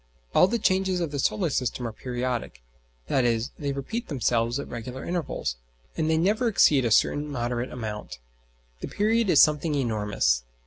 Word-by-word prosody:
All 180 Hz, -, +6 dB
the 235 Hz, -, 0 dB
changes 190 Hz, -3 st, +1 dB
of 165 Hz, -4 st, -2 dB
the 145 Hz, -, -3 dB
solar 175 Hz, +3 st, 0 dB
system 125 Hz, -1 st, -1 dB
are -, -, -5 dB
periodic, 120 Hz, -, -4 dB, 0.4 s
i.e. 120 Hz, -3 st, +2 dB, 0.2 s
they 145 Hz, -1 st, -2 dB
repeat 140 Hz, -, -4 dB
themselves 120 Hz, -3 st, 0 dB
at 140 Hz, -, -5 dB
regular 125 Hz, +3 st, -7 dB
intervals, 170 Hz, -, -3 dB, 0.4 s
and 160 Hz, -1 st, 0 dB
they 160 Hz, -, +3 dB
never 210 Hz, +8 st, +2 dB
exceed 150 Hz, -, +4 dB
a -, -, +2 dB
certain 145 Hz, +7 st, +3 dB
moderate 120 Hz, -2 st, -3 dB
amount. 105 Hz, -, -6 dB, 0.6 s
The -, -, -5 dB
period 220 Hz, +1 st, +1 dB
is 155 Hz, -, +7 dB
something 150 Hz, 0 st, +1 dB
enormous. 105 Hz, -, +1 dB
135 Hz, 165 wpm, -26 LUFS, 120-175 Hz, 0.6 s, is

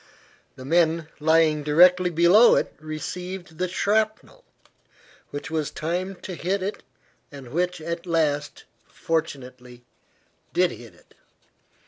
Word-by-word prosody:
The 130 Hz, -, -11 dB
men 165 Hz, +1 st, +1 dB
lying 160 Hz, 0 st, +3 dB
directly 180 Hz, +5 st, +5 dB
below 175 Hz, +8 st, +6 dB
it -, -, -1 dB
received 175 Hz, +3 st, -7 dB
the 185 Hz, -, 0 dB
shrapnel 215 Hz, -, -1 dB, 0.9 s
which 145 Hz, +3 st, -7 dB
was 155 Hz, -2 st, -1 dB
timed 180 Hz, +4 st, -4 dB
to 185 Hz, -, -6 dB
hit 185 Hz, +3 st, -2 dB
it, 200 Hz, +2 st, -4 dB, 0.5 s
and 140 Hz, -4 st, -11 dB
which 180 Hz, +2 st, -1 dB
at 170 Hz, +2 st, -5 dB
last, 150 Hz, -3 st, -1 dB, 0.3 s
fortunately, 125 Hz, -6 st, -5 dB, 0.7 s
did 180 Hz, -1 st, +2 dB
hit 115 Hz, -7 st, -12 dB
it. -, -, -25 dB
165 Hz, 115 wpm, -24 LUFS, 150-180 Hz, 0.9 s, below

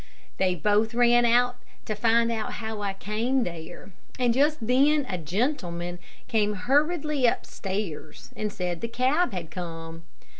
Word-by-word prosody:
They 185 Hz, -1 st, +2 dB
both 210 Hz, +6 st, +1 dB
ran 240 Hz, 0 st, +5 dB
out 245 Hz, +1 st, +3 dB, 0.3 s
to 215 Hz, -, -2 dB
find 230 Hz, +2 st, +3 dB
out 220 Hz, -2 st, -3 dB
how 220 Hz, -2 st, -5 dB
I 200 Hz, -1 st, -1 dB
came 225 Hz, +6 st, 0 dB
there, 170 Hz, +2 st, -8 dB, 0.3 s
and 245 Hz, -2 st, +2 dB
just 295 Hz, +4 st, +3 dB
then 280 Hz, +4 st, +3 dB
a 180 Hz, -5 st, -3 dB
gentleman 175 Hz, -, -2 dB, 0.3 s
came 210 Hz, -2 st, +1 dB
hurriedly 290 Hz, -, +2 dB
upstairs, 190 Hz, -9 st, -4 dB
and 210 Hz, -1 st, -3 dB
said 180 Hz, -3 st, -3 dB
the 230 Hz, -, -2 dB
cab 260 Hz, +9 st, +1 dB
had 170 Hz, -4 st, -6 dB
come. 165 Hz, -2 st, -7 dB
220 Hz, 145 wpm, -26 LUFS, 180-245 Hz, 0.3 s, ran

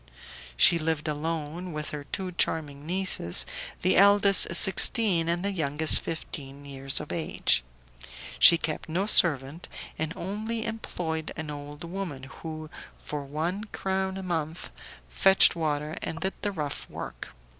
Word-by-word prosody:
She 170 Hz, -, +6 dB
lived 160 Hz, -1 st, -2 dB
alone 160 Hz, +3 st, -4 dB
with 150 Hz, -1 st, -5 dB
her 145 Hz, -1 st, -7 dB
two 185 Hz, +3 st, -5 dB
charming 150 Hz, -4 st, -2 dB
nieces, 180 Hz, -, +1 dB, 0.4 s
the 185 Hz, -, +2 dB
eldest 200 Hz, -2 st, +6 dB
sixteen, 190 Hz, -2 st, +4 dB
and 175 Hz, +3 st, -1 dB
the 200 Hz, -, 0 dB
youngest 155 Hz, -3 st, +2 dB
fifteen 140 Hz, -3 st, -7 dB
years 135 Hz, -1 st, -1 dB
of 150 Hz, -, -8 dB
age. 70 Hz, -, 0 dB, 0.8 s
She 170 Hz, -, +9 dB
kept 160 Hz, 0 st, -4 dB
no 180 Hz, +5 st, -1 dB
servant, 155 Hz, -5 st, +3 dB, 0.3 s
and 160 Hz, 0 st, -2 dB
only 220 Hz, +5 st, -4 dB
employed 165 Hz, -8 st, -5 dB
an 155 Hz, -1 st, -5 dB
old 145 Hz, +1 st, -9 dB
woman, 170 Hz, -6 st, -6 dB
who, 155 Hz, +3 st, -9 dB, 0.3 s
for 150 Hz, -1 st, -6 dB
one 165 Hz, +9 st, -3 dB
crown 190 Hz, -2 st, -3 dB
a 190 Hz, -, -6 dB
month, 165 Hz, -2 st, -4 dB, 0.4 s
fetched 190 Hz, -, +5 dB
water, 150 Hz, -2 st, -3 dB
and 165 Hz, -, -5 dB
did 190 Hz, +2 st, -2 dB
the 205 Hz, -, -2 dB
rough 150 Hz, -6 st, -5 dB
work. -, -, -9 dB
160 Hz, 140 wpm, -26 LUFS, 150-190 Hz, 0.8 s, She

